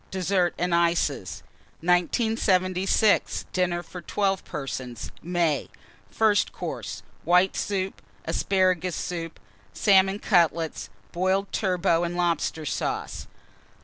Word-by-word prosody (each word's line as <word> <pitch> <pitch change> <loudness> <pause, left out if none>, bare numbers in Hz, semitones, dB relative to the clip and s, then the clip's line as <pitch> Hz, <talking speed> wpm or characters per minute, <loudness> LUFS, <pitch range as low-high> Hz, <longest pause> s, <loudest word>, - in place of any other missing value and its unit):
DESSERT 185 -1 0
AND 180 0 0
ICES. 170 - 0 0.4
1976. 185 +2 +2
DINNER 175 -1 0
FOR 180 - -9
12 195 +2 0
PERSONS 130 -4 -6
(May). 170 -4 0 0.4
FIRST 215 -2 +2
COURSE. - - -6 0.2
White 180 +2 +3
Soup. 195 -1 -2 0.2
Asparagus 185 -2 +1
Soup. 165 -2 -5 0.4
Salmon 195 -1 +4
Cutlets. 165 - +1 0.2
Boiled 190 +2 0
Turbot 180 -3 +1
and 175 0 -3
Lobster 170 -2 0
Sauce. - - -3
180 Hz, 95 wpm, -26 LUFS, 170-190 Hz, 0.4 s, Salmon